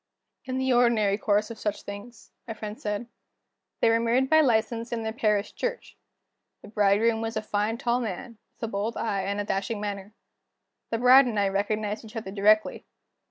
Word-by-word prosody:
"In 260 0 -3
the 260 0 +1
ordinary 235 -5 +3
course 210 +1 0
of 225 - -9
such 210 -1 -3
things," 205 +4 -10 0.2
my 225 - -5
friend 215 0 -7
said. 210 +2 -3 0.8
"They 230 - +5
were 230 - +3
married 245 +4 +1
by 315 0 +7
license, 230 -2 0
in 230 -1 -2
their 220 0 -3
parish 210 -3 0
church. - - -4 0.7
The - - -11
bridegroom 215 +2 +2
was 225 0 -3
a - - -1
fine 215 +2 -1
tall 240 +1 0
man, 225 0 -6 0.2
with - - -14
a - - 0
bold 215 +2 -3
eye 200 -3 -1
and 200 +2 -2
a - - 0
dashing 200 +2 -2
manner. 205 0 -5 0.7
The 230 - -1
bride 255 +2 +7
and 220 -4 -1
I 200 -1 +2
recognized 210 +2 -2
each 220 0 -13
other 215 -4 -5
directly. 210 +2 +2
220 Hz, 190 wpm, -26 LUFS, 205-235 Hz, 0.8 s, by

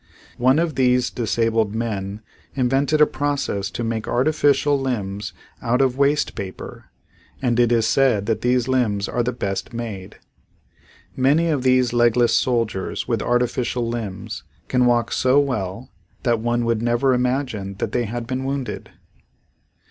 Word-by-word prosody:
One 130 +3 +4
of 165 -1 +1
these 125 -1 +2
disabled 115 -2 0
men 105 -3 -3 0.3
invented 135 +4 +1
a - - +9
process 140 -10 -2
to 120 - -5
make 115 -1 -3
artificial 145 +1 +2
limbs 105 -6 -3 0.3
out 120 +1 +1
of 130 -2 +2
waste 140 +2 +1
paper 95 -2 -8 0.5
and 120 -2 0
it 120 -1 +4
is 115 -2 +3
said 115 -4 +2
that 110 -1 -1
these 125 0 +1
limbs 110 -6 +1
are 120 - -1
the 120 +1 0
best 100 -3 -4
made. 110 -5 -6 1.0
Many 145 +6 +3
of 145 -4 0
these 130 -1 +3
legless 120 -1 +3
soldiers 115 -5 0
with - - 0
artificial 120 0 0
limbs 110 -5 -5 0.2
can 125 -1 +2
walk 120 -1 +2
so 130 +2 +3
well 125 -4 -3 0.3
that 120 -3 +2
one 120 +1 0
would 115 -1 0
never 120 +3 +2
imagine 125 -6 -1
that - - -3
they 120 -1 0
had 115 +2 -4
been 130 +2 -3
wounded. 135 -4 -4
120 Hz, 150 wpm, -22 LUFS, 115-130 Hz, 1.0 s, a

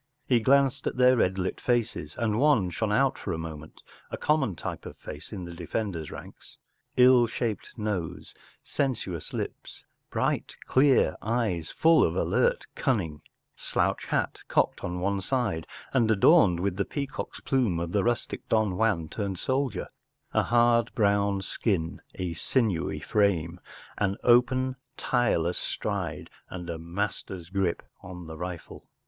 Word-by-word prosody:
He 125 -3 +3
glanced 135 +3 +3
at - - -2
their 125 0 +6
red 95 -5 +2
lit 95 0 -2
faces, 115 -11 -1
and 110 -2 0
one 135 -11 +3
shone 105 +4 -1
out 135 +5 +2
for 95 - -3
a - - -2
moment, 80 -1 -8 0.3
a - - -4
common 150 - +1
type - - -6
of - - -10
face 75 +3 -9
in 95 -4 -5
the 85 - -8
defender’s 85 -1 -3
ranks: - - -11 0.4
ill 125 -1 +7
shaped 115 -1 -4
nose, 105 -7 -3 0.3
sensuous 100 - -2
lips, - - -6 0.3
bright - - -1
clear 135 0 +4
eyes 105 -8 -1
full 165 0 +4
of - - +1
alert 485 0 +1
cunning, 90 - -1 0.3
slouch - - -1
hat - - -1
cocked - - +1
on 90 0 -3
one 100 +1 0
side 105 -8 -1 0.3
and 120 -5 +3
adorned 95 -4 +5
with 95 -1 -1
the 100 - +2
peacock’s 140 -1 -5
plume 120 -11 +1
of 85 0 -3
the 100 0 +2
rustic 120 0 -2
Don 110 -5 +2
Juan 105 -8 +1
turned 100 +1 -3
soldier, 130 +5 -1 0.5
a - - +4
hard 120 0 +3
brown 100 -2 +2
skin, 90 -5 -1
a 90 -2 -3
sinewy 100 - 0
frame, 90 -5 +1 0.4
an 100 -1 +1
open, 130 +2 +3 0.2
tireless 90 -9 +1
stride, 95 -7 -3 0.2
and 90 -1 -6
a 80 - -5
master’s 90 0 -4
grip 95 -3 0 0.2
on 90 -1 -9
the 80 0 -8
rifle. 90 0 -7
100 Hz, 150 wpm, -27 LUFS, 85-120 Hz, 0.5 s, ill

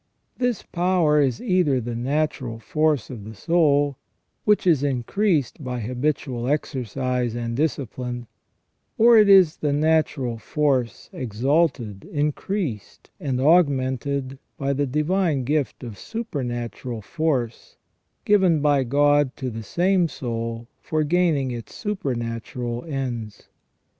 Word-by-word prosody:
This 245 -4 0
power 175 -4 +2
is 130 -4 +1
either 180 - +2
the 120 0 -4
natural 130 -1 -1
force 150 +4 0
of 115 -5 -8
the 110 +2 -9
soul, 145 - +2 0.5
which 210 -2 +3
is 165 -7 +4
increased 145 - 0
by 125 -1 -3
habitual 125 0 -2
exercise 125 -3 -1
and 115 -1 -3
discipline, 125 -4 -2 0.7
or 235 +1 +7
it 210 -1 +5
is 185 -5 +6
the 150 - -1
natural 145 -5 +1
force 130 -3 -1
exalted, 125 - 0
increased, 150 - -3
and 135 -7 -2
augmented 135 -3 +2 0.2
by 140 0 0
the 140 +1 0
divine 150 +1 +1
gift 145 +1 -1
of 110 -5 -8
supernatural 120 - -5
force, 135 -6 -2 0.5
given 190 -6 +4
by 145 -2 +3
God 145 +1 +3
to 130 -3 -3
the 115 0 -6
same 180 - +2
soul 115 -3 -4
for 155 -1 -1
gaining 155 -5 +1
its 120 -2 -7
supernatural 120 - -3
ends. 120 -8 -5
140 Hz, 120 wpm, -23 LUFS, 120-155 Hz, 0.7 s, or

